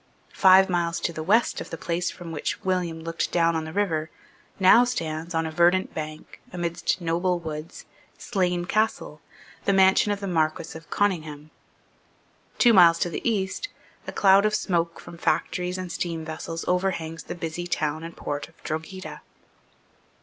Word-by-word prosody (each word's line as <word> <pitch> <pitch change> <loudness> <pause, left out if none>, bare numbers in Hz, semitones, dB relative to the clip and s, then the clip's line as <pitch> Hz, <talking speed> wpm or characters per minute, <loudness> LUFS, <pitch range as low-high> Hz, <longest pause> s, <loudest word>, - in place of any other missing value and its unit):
Five 190 0 +6
miles 170 -2 0
to 170 - -1
the 160 - -5
west 210 +9 +2
of - - -8
the 165 - -6
place 175 +2 -2
from 175 -2 -9
which 150 - -3
William 180 -3 -1
looked 165 0 -3
down 170 -1 +2
on 160 -1 -2
the 160 - -7
river, 165 -5 -1 0.5
now 190 +6 +7
stands, 165 -8 -3
on 165 0 +1
a 160 - -4
verdant 175 +3 +3
bank, 155 0 -7
amidst 170 0 -2
noble 175 +2 0
woods, 160 -1 -7 0.3
Slane 180 -5 -1
Castle, 215 +4 -1 0.4
the 200 - +3
mansion 190 +2 +4
of 205 - -2
the 200 - -5
Marquess 160 -2 -1
of 160 -1 -11
Conyngham. 155 -7 -1 1.1
Two 240 -2 +5
miles 170 -4 +7
to 175 - -1
the - - -4
east, 200 - -2 0.4
a - - -3
cloud 195 0 +5
of 215 0 +2
smoke 170 -4 -1
from 170 - -11
factories 180 +1 -1
and 185 -1 -5
steam 165 -1 -3
vessels 165 +1 -5
overhangs 180 -3 -1
the - - -6
busy 170 +1 -5
town 155 -2 -1
and 165 0 -9
port 145 +1 -4
of 165 - -25
Drogheda. 160 +5 -6
170 Hz, 165 wpm, -25 LUFS, 160-190 Hz, 1.1 s, now